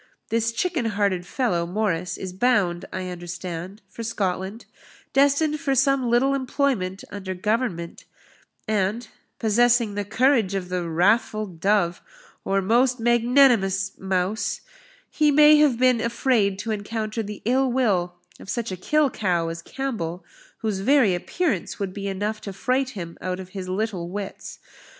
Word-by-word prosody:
This 230 0 +1
chicken 310 +1 -1
hearted 200 -4 0
fellow, 185 -8 0
Morris, 180 -2 -1
is 185 -1 -6
bound, 190 -5 +1
I 185 -1 -4
understand, 175 +2 -7
for 195 - -9
Scotland, 200 -1 -3 0.5
destined 285 +2 +3
for 275 -1 0
some 270 -1 +2
little 255 +4 +3
employment 260 -8 -1
under 190 -2 -5
Government; 190 -3 -2 0.6
and, 215 +2 0 0.3
possessing 235 0 +3
the 205 0 -2
courage 225 -1 +2
of 185 -2 -3
the 180 -2 -2
wrathful 210 +5 +2
dove, 180 -1 0 0.4
or 195 0 0
most 245 +5 +2
magnanimous 235 -5 +3
mouse, 190 +2 -1 0.5
he 305 -1 +2
may 300 +1 +7
have 295 -5 +4
been 250 -2 +3
afraid 230 -4 +1
to 220 +3 -4
encounter 215 +1 -3
the 210 -1 -7
ill 260 +2 +2
will 195 -9 +1 0.2
of - - -12
such 230 0 -2
a 185 - -4
kill 300 - +2
cow 175 -5 0
as 165 0 -6
Campbell, 185 -8 -4 0.4
whose 210 -3 -1
very 245 -2 +4
appearance 210 - -2
would 195 -2 -4
be 200 0 -5
enough 205 +2 -3
to 200 - -6
fright 255 +6 0
him 170 -2 -7
out 185 0 -3
of 185 -1 -8
his 185 -1 -6
little 185 -3 -2
wits. 200 +1 -6
210 Hz, 145 wpm, -24 LUFS, 185-245 Hz, 0.6 s, may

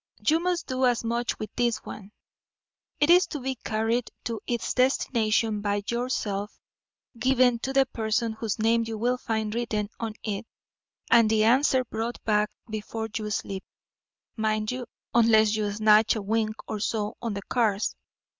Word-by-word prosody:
You 315 +2 +5
must 355 0 -1
do 255 0 +1
as 240 -1 +1
much 235 +1 -1
with 215 - -6
this 240 -2 +1
one. 200 -1 -9 0.9
It 295 +3 +4
is 360 +1 +6
to 295 - -5
be 265 +1 -2
carried 225 0 -1
to 230 -2 -4
its 240 -2 -1
destination 225 -4 +1
by 205 0 -1
yourself, 215 -4 -2 0.6
given 250 -1 +3
to 265 - -3
the 270 0 +4
person 225 -1 -1
whose 220 -1 -3
name 230 +1 +2
you 225 -1 -4
will 245 +3 0
find 220 -2 -2
written 220 -3 -2
on 225 -2 -4
it, 215 +1 -3 0.6
and 230 -2 +6
the 215 -1 +3
answer 255 +2 +4
brought 230 +1 -3
back 210 -1 +2 0.2
before 220 +1 -4
you 215 -1 -2
sleep, 195 -2 -3 0.7
mind 215 -1 0
you, 250 -1 -5 0.3
unless 220 -2 +5
you 210 -1 -1
snatch 215 +1 +4
a 220 - -2
wink 215 +1 0
or 215 - -3
so 215 +1 -2
on 230 -4 -3
the 200 - -5
cars. 215 -4 0
225 Hz, 165 wpm, -26 LUFS, 215-245 Hz, 0.9 s, is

